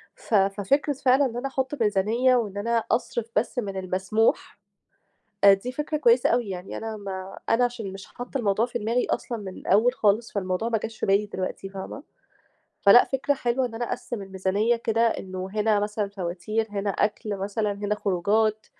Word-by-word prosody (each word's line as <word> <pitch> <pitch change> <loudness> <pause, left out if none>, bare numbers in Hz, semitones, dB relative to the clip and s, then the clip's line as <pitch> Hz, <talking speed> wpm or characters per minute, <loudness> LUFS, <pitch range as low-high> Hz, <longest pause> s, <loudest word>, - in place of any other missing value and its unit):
ف - - -9
ففكرة 205 +9 +2
فعلًا 265 +1 +3
إن 240 -2 -3
أنا 255 +3 -2
أحُط 265 0 -3
ميزانية 220 +5 +3
وإن 210 -5 -1
أنا 230 +2 0
أصرِف 230 -1 -1
بس 230 +3 0
من 200 -4 -4
المسموح، 190 +4 0 0.9
آآ 200 - +10
دي 240 +6 -6
فكرة 300 +3 -2
كويسة 245 -4 +4
أوي. 240 -2 +1
يعني 180 0 -6
أنا 225 -1 -5
ما 195 -2 -7
أنا 240 +2 +4
عشان 230 -5 -3
مش 195 0 -9
حاطّة 245 +3 -6
الموضوع 215 -1 +1
في 240 -1 -4
دماغي 235 +3 0
أصلًا 235 - -2
من 190 -3 -8
الأول 220 +6 +3
خالص، 220 0 +1
فالموضوع 185 +2 -1
ما 225 -1 +1
جاش 220 +1 -7
في - - -1
بالي 200 +2 +3
دلوقتي 190 -1 -5
فاهمة، 195 +8 -7 0.8
فلأ، 205 +5 +8
فكرة 270 +1 0
حلوة 255 -1 0
إن 230 -2 -6
أنا 240 +1 -2
أقسِّم 240 -4 -4
الميزانية 195 +4 0
كده 230 -1 0
إنه 185 -3 -4
هنا 215 -1 +2
مثلًا 210 0 -2
فواتير، 195 +3 -3
هنا 200 0 -2
أكل 205 +1 -1
مثلًا، 205 +2 -1
هنا 205 +1 -2
خروجات، 210 +3 +1
215 Hz, 180 wpm, -25 LUFS, 195-240 Hz, 0.9 s, آآ